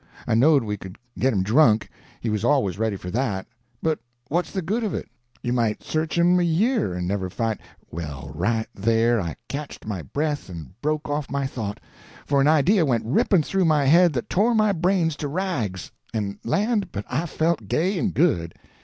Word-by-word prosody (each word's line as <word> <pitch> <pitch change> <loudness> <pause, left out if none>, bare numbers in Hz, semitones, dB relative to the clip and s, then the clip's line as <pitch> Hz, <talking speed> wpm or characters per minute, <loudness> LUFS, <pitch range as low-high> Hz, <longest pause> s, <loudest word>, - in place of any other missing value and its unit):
I - - 0
knowed 135 +4 +5
we 105 -1 -3
could 95 -1 -10 0.2
get 130 - +3
him 95 -5 +1
drunk—he 110 0 +1
was 105 0 -1
always 120 -8 +2
ready 110 -2 0
for 90 -1 -7
that—but 120 - -3 0.3
what's 170 +2 0
the 190 - -3
good 215 +8 -1
of 205 -6 -1
it? - - -4 0.4
You 120 -1 0
might 115 -3 0
search 155 +1 -2
him 175 +1 +4
a - - +2
year 175 - +1
and 90 0 -2
never 95 -1 -1
find—Well, 85 - -5
right 110 +8 0
there 115 +2 +2
I 85 -3 -4
catched 145 +1 -6
my 100 -5 -3
breath 145 - -2
and 80 -6 -8
broke 155 +1 -1
off 145 -1 -2
my 140 -1 -1
thought! 110 -6 -4 0.5
For 140 -1 +2
an 140 - +4
idea 160 +5 +4
went 120 -7 +1
ripping 155 - +3
through 190 +4 +1
my 150 -3 +3
head 170 +4 +6
that 120 - -3
tore 225 +5 +2
my 215 -1 +4
brains 175 -3 +1
to 145 - -3
rags—and 110 - -4
land, 205 - 0
but 100 0 -5
I 160 +7 -1
felt 165 +1 0
gay 180 +4 +1
and 200 - 0
good! 85 - +1
135 Hz, 185 wpm, -24 LUFS, 105-165 Hz, 0.5 s, head